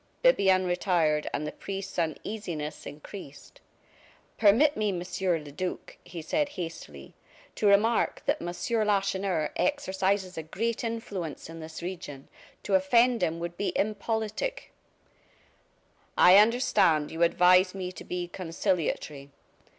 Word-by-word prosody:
Bibiaine 190 - +4
retired, 175 -4 +1
and 150 - -3
the 150 - -4
priest's 195 -1 -6
uneasiness 165 -1 -4
increased. 150 - -11 0.8
"Permit 235 +8 +5
me, 210 -1 0
Monsieur 180 0 -1
le 150 -2 -10
Duc," 185 +5 -5
he 170 -3 -8
said, 295 - 0
hastily, 165 - -8 0.4
"to 210 - 0
remark 210 +3 +3
that - - 0
Monsieur 215 +6 -1
Lacheneur 195 -5 0
exercises 190 - 0
a - - -2
great 225 +10 -3
influence 205 -10 -5
in 165 - -9
this 160 +1 -8
region 170 -7 -7 0.3
to 200 - -3
offend 235 +6 +4
him 165 +1 0
would 170 0 -5
be 205 - -1
impolitic 220 - -2 0.7
" - - -33 0.7
"I 180 +2 +8
understand 210 - +3
you 160 - -5
advise 180 +2 +5
me 185 -1 -4
to - - -10
be 180 -1 -4
conciliatory. 165 -5 -2
185 Hz, 125 wpm, -28 LUFS, 165-210 Hz, 0.8 s, I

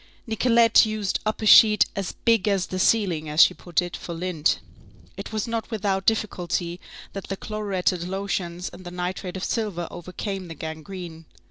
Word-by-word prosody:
Nicolette 230 0 +4
used 215 -3 -1
up 215 +1 -2
a - - 0
sheet 210 0 +8
"as 195 -2 -3
big 230 -4 +3
as 195 -3 +2
the 185 - -5
ceiling," 185 -7 +2
as 150 +1 -2
she - - +4
put 175 0 -1
it, 175 - -6
for 170 - -7
lint. 165 -3 0 0.6
It - - -7
was 215 0 -2
not 230 -1 -3
without 195 -4 -1
difficulty 180 -5 -1 0.3
that 195 - -6
the 195 - -4
chloruretted 190 -5 -2
lotions 185 -2 -3
and 185 - -13
the 175 - -7
nitrate 180 +1 -4
of 185 - -6
silver 200 -7 -2
overcame 185 +2 -5
the 165 - -8
gangrene. 160 +2 -7
190 Hz, 170 wpm, -24 LUFS, 175-215 Hz, 0.6 s, sheet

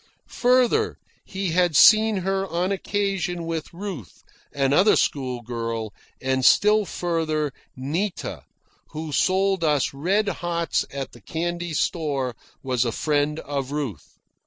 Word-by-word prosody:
Further, 255 - +2 0.3
he 190 -2 -3
had 175 -2 +2
seen 220 +2 +7
her 195 0 0
on 175 +3 -1
occasion 195 -3 -2
with 165 -2 -4
Ruth, 175 - -8 0.3
another 140 +9 +4
schoolgirl, 115 -4 -2 0.3
and, 130 0 0
still 210 +8 +5
further, 155 -5 -1 0.2
Nita, 165 +9 -3 0.5
who 155 0 -5
sold 190 +3 +2
us 150 -4 +1
red 190 +9 +1
hots 170 -4 -1
at 135 -1 -5
the 120 - -16
candy 170 +4 -3
store, 140 -7 -1 0.3
was 130 -3 +1
a 120 - -1
friend 150 +4 0
of 140 -2 -4
Ruth. 135 - -5
165 Hz, 120 wpm, -24 LUFS, 135-190 Hz, 0.5 s, seen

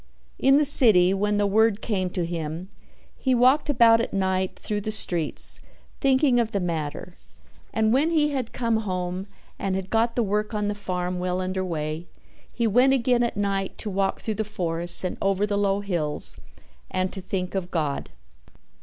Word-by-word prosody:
In 270 +1 +5
the 300 - +4
city, 215 -11 +6
when 205 +1 0
the 205 - +2
word 215 +1 +2
came 190 -6 -2
to 180 -1 -2
him, 165 +1 -5 0.5
he 260 -2 0
walked 260 +5 +3
about 230 -4 +5
at - - -4
night 190 -1 -1
through 210 -1 -3
the 215 - -3
streets 175 -7 +2 0.4
thinking 265 -2 +3
of 230 -1 -1
the 200 - 0
matter 170 0 -4 0.5
and 220 0 +1
when 290 +5 +2
he 300 -3 +2
had 260 -5 -3
come 230 -2 0
home 185 -2 -3 0.3
and 190 -1 -1
had 190 0 -5
got 230 +1 +1
the 240 - +1
work 210 +1 -2
on 210 -1 -1
the - - -1
farm 180 -3 -3
well 180 0 -2
under 185 0 -2
way, 160 -1 -4 0.4
he 235 - -2
went 250 +5 +4
again 245 -2 +2
at 235 -3 -1
night 195 -1 -2
to 210 - -4
walk 195 0 -1
through 220 - -2
the - - 0
forests 175 -5 +1
and 185 - -3
over 195 +1 +1
the 205 -1 -2
low 200 0 +1
hills 170 -7 -1 0.5
and 185 0 -2
to 190 - -6
think 185 0 -4
of 190 -2 -3
God. 150 -6 -2
200 Hz, 185 wpm, -24 LUFS, 180-230 Hz, 0.5 s, city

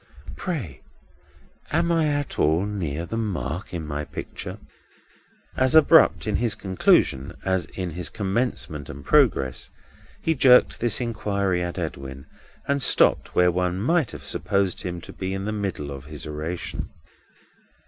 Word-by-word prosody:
Pray 115 - -5 0.9
am 170 +2 +1
I 165 -2 +2
at 145 -1 -2
all 80 +5 +3
near 85 -6 -3
the 115 +6 -3
mark 90 - -3
in 85 -3 -4
my 75 0 -3
picture?" - - -7 1.0
As 130 +3 +2
abrupt 160 +1 +6
in 105 -2 0
his 115 -2 +1
conclusion 95 -9 +1
as 95 -1 +1
in 90 -2 -3
his 85 -1 -3
commencement 100 - -2
and 70 +1 -9
progress, 110 - +2 0.5
he 165 - +2
jerked 130 -4 +5
this 120 -1 +2
inquiry 100 -6 -1
at 85 +1 -4
Edwin, 70 -5 -5 0.4
and 140 0 +1
stopped - - +4
when 90 -1 +4
one 90 +1 0
might 155 - +2
have - - -9
supposed 100 -2 0
him 90 -2 -5 0.2
in 95 +1 -3
the 105 - -2
middle 95 -9 -3
of 70 -1 -8
his 75 -2 -6
oration. 80 +3 -5
95 Hz, 140 wpm, -24 LUFS, 80-115 Hz, 1.0 s, abrupt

